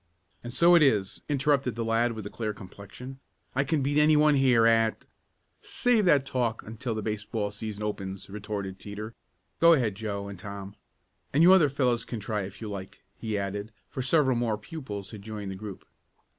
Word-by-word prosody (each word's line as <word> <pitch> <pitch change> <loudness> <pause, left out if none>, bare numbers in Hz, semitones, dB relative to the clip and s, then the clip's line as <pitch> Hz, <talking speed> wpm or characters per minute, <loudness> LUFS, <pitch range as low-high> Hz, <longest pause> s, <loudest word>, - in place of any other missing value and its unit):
"And 120 - -6
so 170 +7 +5
it 170 - +7
is!" 105 -9 +2
interrupted 140 -4 +1
the 115 -1 -2
lad 115 +1 +2
with 110 -1 -6
the 105 - -7
clear 110 -2 -3
complexion. 100 +7 -10 0.3
"I 135 - +2
can 145 0 0
beat 145 +2 +2
any 150 0 +5
one 150 0 +5
here 130 -4 +4
at 115 -1 +3 0.3
" - - -46 0.2
"Save 240 -4 +4
that 145 -6 +4
talk 120 -4 -1
until 115 +2 -4
the 110 - -3
baseball 105 0 -2
season 105 0 -5
opens!" 100 -2 -4
retorted 100 -2 -5
Teeter. 105 +2 -7 0.5
"Go 170 0 +7
ahead, 120 -9 +2
Joe 100 -1 -4
and 100 -3 -8
Tom. 100 +1 -8 0.6
And 150 +4 +5
you 180 +2 +9
other 165 -6 +6
fellows 125 -4 +1
can 115 - -5
try 105 0 -2
if 95 +3 -11
you 110 - -5
like," 100 -2 -8 0.2
he 110 -2 -2
added, 100 +2 -4 0.2
for 130 - -3
several 130 0 +3
more 115 -2 0
pupils 105 -5 -7
had 105 -3 -9
joined 105 -2 -6
the - - -5
group. 100 0 -8
110 Hz, 195 wpm, -28 LUFS, 100-135 Hz, 0.6 s, you